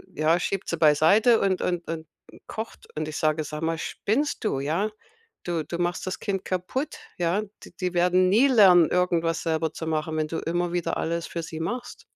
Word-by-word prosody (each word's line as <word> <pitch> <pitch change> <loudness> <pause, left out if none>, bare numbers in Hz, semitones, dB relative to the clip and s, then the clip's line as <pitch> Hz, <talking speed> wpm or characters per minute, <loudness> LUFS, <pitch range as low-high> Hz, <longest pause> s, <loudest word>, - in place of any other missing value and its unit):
ja, 160 +3 +3
schiebt 195 +1 -3
sie 170 - -1
beiseite 165 - +5
und 190 -2 +1
und 175 -1 -2
und 160 -1 -5 0.4
kocht. 220 +1 -7
Und 155 0 -2
ich 155 - -5
sage: 155 0 +1
„Sag 150 +1 -6
mal, 165 0 0
spinnst 250 - -1
du, 135 - 0
ja? 165 +10 0 0.5
Du 170 -3 -2
du 170 +3 -5
machst 175 +1 -1
das 185 - -3
Kind 195 -3 -2
kaputt, 225 - -3 0.2
ja? 175 +4 +1 0.2
D - - -12
die 180 -1 -1
werden 180 +1 +4
nie 230 +8 +5
lernen, 185 - +7
irgendwas 170 -2 +1
selber 160 -1 0
zu 160 - -6
machen, 155 0 -1
wenn 155 -1 0
du 165 - -3
immer 175 +1 -1
wieder 170 -2 -1
alles 170 0 -2
für 170 - -4
sie 160 0 -7
machst.“ 245 +9 -5
170 Hz, 195 wpm, -25 LUFS, 160-185 Hz, 0.5 s, lernen